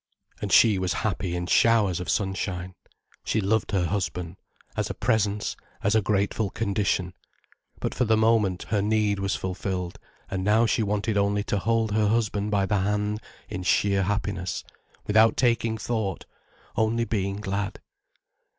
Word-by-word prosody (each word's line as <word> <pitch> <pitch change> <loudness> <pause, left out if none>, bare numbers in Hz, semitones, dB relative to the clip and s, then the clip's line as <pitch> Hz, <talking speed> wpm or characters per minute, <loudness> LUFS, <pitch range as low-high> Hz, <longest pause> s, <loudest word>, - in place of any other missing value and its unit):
And - - -3
she 105 -4 +6
was 95 -1 0
happy 90 -3 -1
in 90 0 -2
showers 105 -2 +3
of 90 - -5
sunshine. 95 -2 -2 0.5
She 110 - 0
loved 105 +1 +1
her 95 -4 +1
husband, 90 -1 -3 0.4
as - - -1
a - - -4
presence, 105 -1 0 0.3
as 100 - +2
a 110 - +4
grateful 100 +1 0
condition. 100 -4 -1 0.7
But - - -2
for 125 - +1
the 110 0 +3
moment 110 -5 +2
her 105 -2 +1
need 105 -1 +1
was 100 0 0
fulfilled, 95 -1 -4 0.3
and 95 -1 -3
now 110 +4 +4
she 115 +1 +1
wanted 105 0 0
only 100 0 +1
to 105 - -1
hold 115 +1 +1
her 105 0 +2
husband 105 -2 0
by 100 -2 +2
the 100 +1 +1
hand 105 +2 -1 0.3
in - - -5
sheer 100 +2 +2
happiness, 100 -2 -2 0.4
without 110 +1 +4
taking 115 -2 +2
thought, 110 -4 -2 0.5
only 115 +1 +1
being 100 -3 -1
glad. 100 0 -3
100 Hz, 155 wpm, -26 LUFS, 95-110 Hz, 0.7 s, she